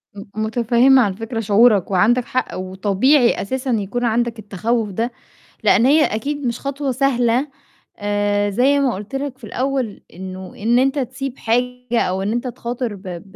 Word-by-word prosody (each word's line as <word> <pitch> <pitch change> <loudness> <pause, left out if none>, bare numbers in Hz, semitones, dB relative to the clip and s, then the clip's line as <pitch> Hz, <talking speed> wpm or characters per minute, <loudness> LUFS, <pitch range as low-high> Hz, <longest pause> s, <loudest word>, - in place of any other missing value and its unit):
م 200 - -8 0.2
متفهِّمة 240 +4 +4
عن 200 -4 +1
فكرة 225 +3 -5
شعورك، 210 -2 +4
وعندك 230 +6 +3
حق 255 - -2
وطبيعي 200 +8 +2
أساسًا 260 +5 -3
يكون 225 +3 -1
عندك 235 0 0
التخوُّف 215 +2 -2
ده، 230 +6 -2 0.5
لإن 235 - +4
هي 300 +3 +5
أكيد 280 +6 -3
مش 235 0 -2
خطوة 275 0 -3
سهلة، 250 0 +1 0.5
آآ، 205 0 0
زي 270 +7 +3
ما 265 -4 +1
قُلت 210 +7 -7
لك 270 -1 -4
في 255 - -28
الأول 255 0 -2
إنه 185 +1 -8
إن 235 +4 +2
أنت 270 +2 +1
تسيب 260 +1 -4
حاجة 245 +1 -1
أو 190 +1 -1
إن 205 +2 -1
أنت 240 +2 -2
تخاطر 240 -2 -4
ب 190 - -14
ب 175 -3 -6
235 Hz, 165 wpm, -20 LUFS, 205-255 Hz, 0.5 s, هي